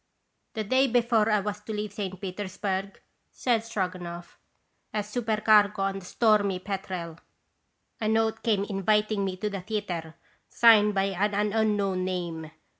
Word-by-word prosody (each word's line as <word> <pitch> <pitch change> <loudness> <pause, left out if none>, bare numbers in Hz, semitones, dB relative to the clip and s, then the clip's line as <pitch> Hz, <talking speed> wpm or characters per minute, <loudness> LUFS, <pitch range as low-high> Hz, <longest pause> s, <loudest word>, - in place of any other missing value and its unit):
" - - -49
The 220 - -1
day 260 +6 +3
before 235 -3 +2
I 210 -2 +3
was 210 +1 -4
to 215 +1 -7
leave 210 -1 -4
.St. 190 -4 -5
Peters 190 0 -6
burg," 195 -1 -3 0.3
said 235 -3 0
Stroganoff, 180 -5 -5 0.5
"as 210 -1 -2
supercargo 215 -2 +3
on 195 0 -1
the 185 - -13
Stormy 205 -2 +2
Petrel, 185 -4 -5 0.8
a 215 - -1
note 225 0 +1
came 210 -4 +1
inviting 210 +1 +1
me 190 -1 -3
to 210 - -2
the 195 -2 -4
theatre, 180 -6 -4 0.3
signed 210 -3 +5
by 195 - +2
an 205 +2 0
unknown 205 -4 +1
name. 170 -4 -4
205 Hz, 150 wpm, -27 LUFS, 185-215 Hz, 0.8 s, signed